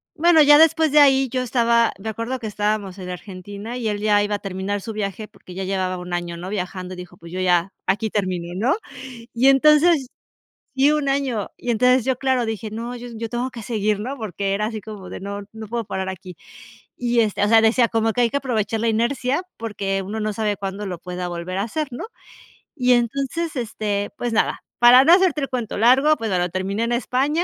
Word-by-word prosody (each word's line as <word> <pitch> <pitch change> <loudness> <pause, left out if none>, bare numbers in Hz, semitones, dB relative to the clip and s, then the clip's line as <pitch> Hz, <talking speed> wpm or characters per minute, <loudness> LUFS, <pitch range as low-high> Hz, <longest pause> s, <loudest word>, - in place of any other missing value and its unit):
bueno, 330 -1 +5
ya 295 +1 +7
después 320 -1 +4
de 300 - +6
ahí 270 -2 +5
yo 255 +1 -1
estaba. 235 -1 +2
Me 205 +3 -5
acuerdo 230 +4 -3
que 240 - -9
estábamos 210 -2 -2
en 180 -1 -7
Argentina 200 +5 -7
y 235 -3 -3
él 205 -1 -2
ya 210 -1 +3
iba 205 0 0
a - - -4
terminar 195 +1 -3
su 220 +3 -7
viaje 210 0 -4
porque, 180 - -14
ya 190 - -3
llevaba 185 -1 -1
1 180 0 -7
año, 175 -1 -3
¿no?, 180 +2 -7
viajando, 185 -2 -4
y - - -9
dijo: 180 -2 -10
"Pues, 170 0 -13
yo 185 - -4
ya 180 0 +2
aquí 210 +3 0
terminé", 180 -4 -2
¿no? 235 - +1 0.6
Y 245 +3 +3
entonces. 300 +1 +5 0.7
Sí, 270 +2 +4
1 295 -2 0
año, 265 -7 -1
y 245 - -6
entonces 250 +1 +3
yo 260 -1 +1
claro, 260 -2 +1
dije: 220 0 -4
"No, 235 +3 -5
yo 245 +1 -8
yo 225 +1 -4
tengo 240 +2 -2
que 240 -2 -9
seguir", 210 -2 -1
¿no? 255 +6 -4
Porque, 200 -3 -3
era 210 +2 0
así 220 -1 -5
como 205 -3 -9
de - - -7
no, 200 +1 -5
no 220 -1 -9
puedo 235 +2 -3
parar 190 -1 -4
aquí 185 -2 -9 0.6
y 240 -1 +1
este, 210 -2 0
o - - +3
sea, 225 +1 +6
decía 230 +2 +4
como 225 -1 +1
que 245 - +1
hay 235 - +3
que 280 - -1
aprovechar 225 -5 -1
la 230 - +1
inercia 250 +6 0 0.2
porque 195 -3 -3
uno 215 +3 -4
no 215 0 -1
sabe 210 -1 -1
cuándo 195 +1 -5
lo 180 -3 -5
pueda 180 0 -5
volver 175 +1 -5
a 195 - 0
hacer, 300 +8 -3
¿no? 245 - -6 0.7
Y 250 -3 +3
entonces, 275 +7 -1
este, 210 -3 -2
pues, 245 - -2
nada 225 - +1 0.2
para 245 +2 +8
no 320 - +5
hacerte 360 -5 +3
el 275 - -2
cuento 245 -5 -3
largo, 260 +8 +5
pues 225 -1 -3
bueno, 180 -2 +1
lo - - -4
terminé 190 +5 -2
en 235 +1 0
España 270 +7 0
220 Hz, 225 wpm, -22 LUFS, 195-250 Hz, 0.7 s, para